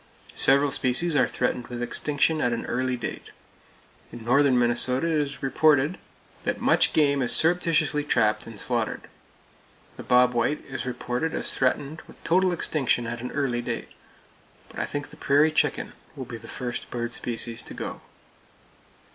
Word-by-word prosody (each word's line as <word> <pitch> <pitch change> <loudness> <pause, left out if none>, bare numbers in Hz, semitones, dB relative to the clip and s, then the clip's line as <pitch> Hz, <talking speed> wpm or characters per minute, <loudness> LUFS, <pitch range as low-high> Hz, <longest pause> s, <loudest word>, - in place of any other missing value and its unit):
Several 140 +1 +3
species 135 +7 +2
are - - +4
threatened 125 -1 -2
with 120 0 -5
extinction 150 +5 0
at 120 - +1
an 115 - -3
early 130 +1 -1
date. 120 - -6 0.8
In 115 -1 -10
northern 135 +1 +4
Minnesota 125 +3 +2
it 165 - 0
is 140 -1 -5
reported 145 +3 +3 0.4
that - - -2
much - - +3
game 140 -2 +2
is 125 - +1
surreptitiously 165 -3 +2
trapped 110 -6 +1
and 115 -2 -9
slaughtered. 120 -3 -1 1.0
The - - -7
bob 125 0 +4
white 120 +5 0
is 130 -2 -5
reported 125 +4 -2
as - - 0
threatened 140 +4 -1
with - - -15
total 185 +2 +3
extinction 140 -8 0
at 120 0 -5
an 125 - -4
early 130 -4 0
date; - - -4 0.8
but - - -9
I - - 0
think 145 0 -5
the - - -13
prairie 145 +3 +3
chicken 150 -2 0 0.2
will 135 -3 -6
be 120 -1 -7
the 115 0 -13
first 120 0 -5
bird 120 -1 -4
species 115 -1 -4
to - - -9
go. - - -6
130 Hz, 165 wpm, -25 LUFS, 120-150 Hz, 1.0 s, are